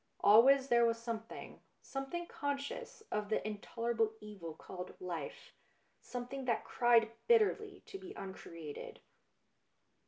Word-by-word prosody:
Always 260 +6 +8
there 235 0 +6
was 230 0 +3
something 230 -1 -6 0.2
something 270 +6 -4
conscious 285 +9 -4
of 210 -1 -1
the 215 - 0
in 210 -1 -3
tolerable 230 0 0
evil 195 -7 -8
called 180 -1 -8
life, 170 -5 -5 0.5
something 250 +2 -5
that 235 -2 +1
cried 235 -2 +4 0.2
bitterly 430 -3 +3
to 390 - -8
be 380 0 -9
uncreated. 165 -5 -7
230 Hz, 120 wpm, -35 LUFS, 210-275 Hz, 0.5 s, Always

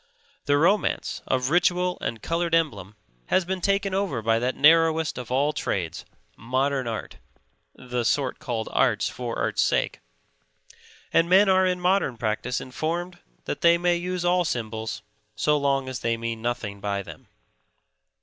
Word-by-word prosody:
The 145 0 +3
romance 190 +7 +1
of 130 +1 0
ritual 180 +1 +2
and 115 -2 -4
colored 170 0 0
emblem 105 - -1 0.3
has 185 - +2
been 185 0 -3
taken 195 +1 +1
over 190 - -1
by 115 +1 +2
that 125 +2 -1
narrowest 160 0 +4
of 125 - -8
all 140 +4 +1
trades, 90 - -3 0.3
modern 130 +2 -1
art 115 -2 -5 0.6
(the 125 -1 -3
sort 135 +2 0
called 120 -7 -3
art - - +2
for 120 -2 -3
art's - - 0
sake), - - 0 1.1
and 165 +1 +3
men 195 +3 +6
are 190 0 +4
in 180 -1 0
modern 180 -8 +1
practice 115 +3 -2
informed 170 +7 -4 0.3
that - - -4
they 170 0 +6
may 175 0 +2
use 180 0 -3
all 180 0 +3
symbols 110 -6 -4 0.3
so 150 - +2
long 140 -2 +1
as 130 -3 -4
they 115 +2 -1
mean 115 -1 -4
nothing 120 -4 -3
by 100 -1 -2
them. - - -12
140 Hz, 155 wpm, -25 LUFS, 115-175 Hz, 1.1 s, men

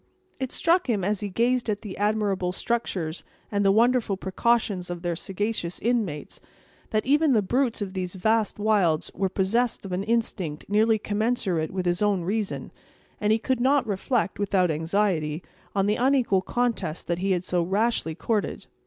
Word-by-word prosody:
It 260 -1 -3
struck 345 -2 +2
him, 205 -5 +1
as 205 +1 0
he 205 - -3
gazed 240 +4 +1
at 205 -1 -2
the 205 -4 -6
admirable 205 -3 0
structures 185 -6 -2 0.3
and 205 -1 +1
the 195 - +5
wonderful 230 -1 +3
precautions 195 -1 0
of 175 0 -5
their 175 -1 -1
sagacious 195 -1 -3
inmates, 215 -11 -2 0.5
that 215 0 0
even 290 +1 +4
the 215 -3 +3
brutes 240 +1 0
of 190 -2 -6
these 185 -1 -4
vast 220 +2 +1
wilds 205 -7 +2
were 190 +1 0
possessed 215 +5 0
of 190 - -6
an 180 +1 -1
instinct 200 -8 -2
nearly 220 +2 +3
commensurate 205 -6 0
with 185 -1 -3
his 175 +2 0
own 205 -4 +2
reason; 205 +3 -2 0.5
and 210 0 +1
he 220 - +4
could 255 +2 -1
not 265 +2 +3
reflect, 210 +1 -1
without 190 -4 +2
anxiety, 160 -1 0 0.3
on 195 -1 +2
the 210 +1 +1
unequal 250 -6 +3
contest 230 -7 -1
that 170 0 -1
he 195 +2 -1
had 180 -1 -1
so 180 -1 +1
rashly 195 -2 0
courted. 215 +3 -2
205 Hz, 170 wpm, -26 LUFS, 185-230 Hz, 0.5 s, the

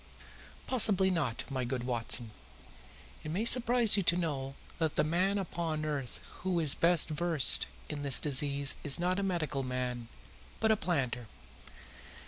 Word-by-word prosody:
"Possibly 200 -6 +2
not, 145 -10 -2
my 130 -2 -2
good 125 0 -4
Watson. 120 -2 -1 0.9
It - - -7
may 190 +8 -2
surprise 240 -2 +3
you - - +2
to 170 -1 +2
know 135 -6 -4 0.2
that 160 -2 -1
the 150 - +2
man 180 +6 0
upon 165 -4 -4
earth 140 -5 -5 0.2
who 180 -1 -2
is 155 -4 +3
best 170 -1 +3
versed 160 -2 +2 0.2
in 150 -2 -6
this 140 -2 +5
disease 140 -1 +3
is 145 0 +3
not 180 +2 -1
a - - -1
medical 170 -7 -2
man, 125 -2 -4 0.5
but 220 0 +2
a - - +4
planter. 130 - -3
155 Hz, 150 wpm, -30 LUFS, 135-180 Hz, 0.9 s, this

